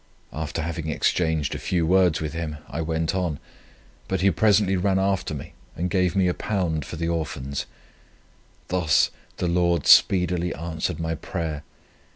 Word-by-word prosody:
After 80 +1 -3
having 80 -1 -4
exchanged 80 -2 0
a - - -4
few 85 -3 0
words 90 -2 +3
with 75 -1 -3
him, 80 -2 -4
I 80 - -4
went 80 +2 -1
on; 90 -6 -1 0.7
but 95 -1 -1
he 100 +1 +4
presently 100 +1 +3
ran 95 +1 +1
after 95 -4 0
me, 70 - -8 0.2
and 90 +2 -2
gave 90 -2 +1
me 95 -1 +3
£1 90 -4 -1
for 75 - -7
the 85 +1 -2
Orphans. 70 -5 -3 1.0
Thus 90 -5 +3 0.3
the 90 - -1
Lord 85 -2 +1
speedily 90 -2 +4
answered 80 0 -3
my 80 0 -1
prayer. 80 -1 -4
85 Hz, 155 wpm, -24 LUFS, 80-90 Hz, 1.0 s, he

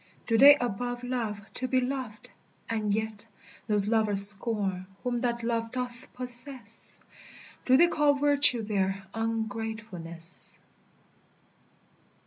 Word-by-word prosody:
Do 230 - -1
they 280 +5 +7
above 245 0 -5
love 230 -5 -5
to 255 - -5
be 255 0 0
loved, 255 -4 -6 0.4
and 215 -2 -3
yet 220 +1 -4 0.4
Those 210 -1 +5
lovers 210 -3 +6
scorn 200 -3 -3 0.2
whom 245 -1 -3
that 235 -2 -3
love 230 -1 -3
doth 250 -1 -7
possess? 245 -2 -1 0.7
Do 260 0 +4
they 340 - +5
call 295 -4 +1
virtue 285 -4 +4
there 195 -2 -3
ungratefulness? 220 -7 -1
230 Hz, 115 wpm, -26 LUFS, 210-250 Hz, 0.7 s, they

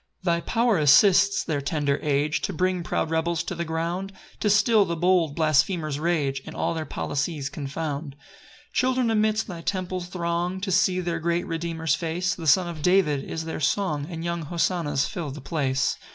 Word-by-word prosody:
3 - - -17
Thy 170 - -1
power 230 +1 +1
assists 185 +7 +5
their 150 -4 -2
tender 145 0 0
age 150 +1 0
To - - -2
bring 185 +1 0
proud 165 -1 -2
rebels 165 +1 0
to 190 - -4
the 170 -1 -3
ground, 170 +4 -3 0.3
To 210 - +1
still 215 +1 +5
the 170 -3 -2
bold 175 -3 +2
blasphemer's 155 -1 +1
rage, 150 -5 0
And - - -9
all - - -1
their 160 -2 -4
policies 145 0 -3
confound. 145 0 -4
4 - - -25 0.5
Children 255 -2 +1
amidst 215 0 +1
thy 175 -4 -7
temple 185 0 -2
throng 175 +1 -2
To 195 -1 -2
see 185 0 +3
their 170 -1 -2
great 170 +1 0
Redeemer's 165 -1 -2
face; 170 +2 -1
The 165 -2 -6
Son 175 +5 +5
of 165 -3 -6
David 165 -6 +3
is 160 0 -5
their 160 - -4
song, 155 -3 0
And 165 -2 -6
young 170 0 -2
hosannas 165 -3 0
fill 170 -5 -5
the 140 +2 -7
place. 135 -3 -1
170 Hz, 185 wpm, -25 LUFS, 150-185 Hz, 0.5 s, assists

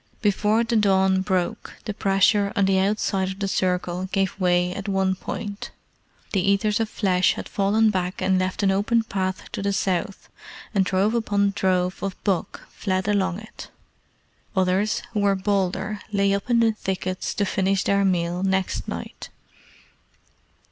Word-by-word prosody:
Before 210 +2 +2
the 235 0 -1
dawn 190 -2 +3
broke 185 -2 -2
the 210 - -3
pressure 200 0 +2
on 200 - +3
the 190 0 +3
outside 195 -1 0
of 190 - -6
the 200 -1 -2
circle 180 -1 -1
gave 195 0 -1
way 180 -1 +2
at 200 +2 -6
one 190 -1 +1
point. 205 +2 -6 0.6
The 195 - +2
Eaters 200 +3 +2
of 225 -1 -1
Flesh 185 -4 +2
had - - -7
fallen 210 +2 +2
back 185 -1 -2
and 190 -1 +2
left 185 +2 -2
an 195 - +4
open 215 +4 +2
path 190 -3 -3
to - - -4
the 200 0 0
south, 190 +1 -2 0.5
and 195 -2 +3
drove 195 +3 +1
upon 205 -3 +1
drove 185 -2 0
of 195 -1 -3
buck 195 -4 -2
fled 185 -1 -2
along 195 -2 0
it. 220 - -11 0.9
Others, 190 +3 +1
who 210 - 0
were 200 -1 +3
bolder, 200 +1 -1
lay 200 -1 +2
up 200 +4 -3
in 235 -1 +4
the 225 -1 +4
thickets 190 -3 -3
to 205 - +1
finish 195 0 +1
their 200 0 +2
meal 175 -2 0
next 190 -1 -1
night. - - -7
195 Hz, 160 wpm, -24 LUFS, 185-205 Hz, 0.9 s, an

